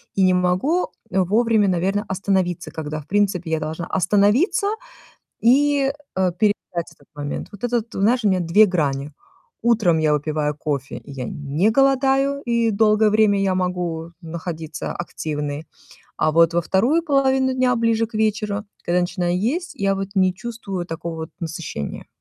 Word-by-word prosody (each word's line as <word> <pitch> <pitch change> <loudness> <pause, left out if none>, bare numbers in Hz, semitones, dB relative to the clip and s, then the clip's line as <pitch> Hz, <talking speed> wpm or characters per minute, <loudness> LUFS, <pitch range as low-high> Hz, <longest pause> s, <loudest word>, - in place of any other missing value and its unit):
и 195 - +3
не 185 0 +5
могу, 180 - +1 0.2
э, 190 - +1
вовремя, 220 +2 +2
наверно, 190 +4 0
остановиться, 190 -2 -1
когда, 155 -1 -5
в 145 - -19
принципе, 195 -4 0
я 160 - +1
должна 160 +3 -4
остановиться, 205 - +2 0.7
и, 275 +3 +3 0.2
э, 185 -1 +2
переждать 185 -5 -1
этот 145 - -25
момент. 145 0 -5
Вот 205 - -12
это 245 0 +1
вот, 230 0 -2
знаешь, 225 +4 +1
у - - +5
меня 185 -2 +2
2 175 +5 +5
грани. 145 -5 -1 0.5
Утром 215 -8 +3
я 155 -1 +2
выпиваю 150 0 -1
кофе, 140 -3 -3
я 135 -3 -6
не 145 - 0
голодаю, 270 +2 +2
и 235 -1 +1
долгое 215 0 +4
время 215 -2 +3
я 195 -1 +1
могу 180 -3 -2
находиться 165 -2 -5
активной, 150 -3 -4 0.5
а 155 - +1
вот 165 +1 +4
во 170 - +2
2 250 - +2
половину 265 -3 +2
дня, 255 -1 +2
ближе 230 0 +1
к 225 - -22
вечеру, 210 -1 0 0.2
когда 175 +1 +2
начинаю 175 0 -1
есть, 300 - -2
я 195 -6 0
вот 195 0 -3
не 185 -2 +3
чувствую 225 -2 -6
вот 175 - -6
такого 165 +1 -5
вот 160 0 -6
насыщения. 160 - -5
190 Hz, 160 wpm, -21 LUFS, 165-225 Hz, 0.7 s, не